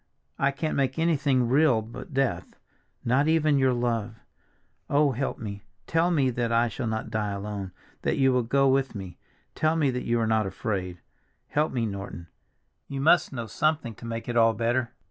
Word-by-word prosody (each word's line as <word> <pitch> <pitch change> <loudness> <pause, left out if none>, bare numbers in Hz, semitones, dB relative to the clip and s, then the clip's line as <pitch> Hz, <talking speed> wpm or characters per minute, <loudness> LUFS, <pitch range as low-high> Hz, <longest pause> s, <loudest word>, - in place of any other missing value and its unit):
I 135 - +3
can't 155 +3 -2
make 135 0 0
anything 145 -6 +2
real 130 -3 +3
but 115 +7 -10
death, 135 -2 -1 0.5
not 130 +5 +3
even 155 -3 +3
your 130 -1 +4
love! 115 -3 -1 0.7
Oh, 145 0 +3
help 135 +2 -2
me, 100 -2 -6 0.2
tell 165 +2 +2
me 140 -7 +2
that 120 -1 -1
I 115 +1 +3
shall 120 - -4
not 110 0 -3
die 105 -1 -1
alone, 100 -1 -5 0.3
that - - 0
you 135 -1 +4
will 125 - +3
go 135 +4 +2
with 135 -2 +1
me, 95 -4 -8 0.3
tell 155 +1 +1
me 150 -5 +2
that 125 0 -4
you 120 0 +1
are 115 - +1
not 110 -2 +1
afraid; 95 -3 -4 0.5
help 150 +2 +1
me, 120 -3 -1
Norton. 100 -4 -6 0.6
You 140 - -5
must 160 +4 +4
know 120 -4 -4
something 145 -1 0
to 115 - -12
make 115 0 -5
it 120 - -3
all 115 -1 +4
better!" 120 +3 0
125 Hz, 185 wpm, -26 LUFS, 110-140 Hz, 0.7 s, your